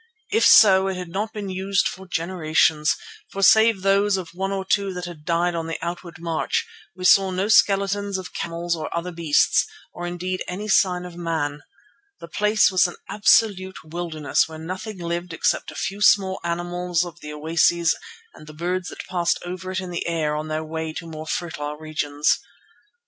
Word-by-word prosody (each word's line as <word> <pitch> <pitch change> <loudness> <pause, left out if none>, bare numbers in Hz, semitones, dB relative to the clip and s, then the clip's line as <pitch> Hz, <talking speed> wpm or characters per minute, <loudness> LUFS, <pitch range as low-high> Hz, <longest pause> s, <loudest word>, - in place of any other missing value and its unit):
If 445 +3 +3
so, 190 -3 +7
it 190 - -2
had 180 -2 -6
not 210 +5 -3
been 205 -3 -5
used 195 +1 +1
for 190 +1 -8
generations, 160 -3 +1 0.3
for 195 - -4
save 220 -2 +5
those 195 0 +3
of 180 -3 -6
one 190 +2 -3
or 195 -1 -3
two 195 -1 0
that 180 0 -4
had 165 -4 -10
died 175 +1 +1
on 165 -1 -3
the 165 - -3
outward 170 +1 -6
march, 165 -1 -1 0.3
we 185 0 -6
saw 195 +1 +6
no 185 +3 -1
skeletons 200 -1 +3
of 185 -3 -8
camels 170 +1 -2
or 155 -1 -5
other 175 +2 -3
beasts, 165 -4 +3 0.3
or 175 0 -5
indeed 180 +1 -3
any 200 +4 -5
sign 180 -3 +2
of 175 -1 -9
man. 160 -4 -2 0.6
The - - -9
place 210 +4 +3
was 185 -1 +4
an 175 - -8
absolute 200 -2 +3
wilderness 160 -2 -1
where 160 - -8
nothing 185 +6 -6
lived 170 0 -4
except - - 0
a - - -10
few 195 +2 -4
small 190 -2 +4
mammals 175 0 -1
at 170 -1 -9
the 150 -3 -8
oases 165 +2 +2 0.4
and 155 - -14
the 155 - -11
birds 180 +3 -2
that - - -8
passed 175 -2 0
over 180 +1 -6
it 185 0 -2
in 185 -1 -6
the 170 - -3
air 155 -3 0
on 155 +1 -4
their 155 0 -2
way 160 0 -4
to 165 - -6
more 155 -1 -8
fertile 150 -4 -4
regions. 150 -1 0
175 Hz, 185 wpm, -23 LUFS, 165-190 Hz, 0.6 s, so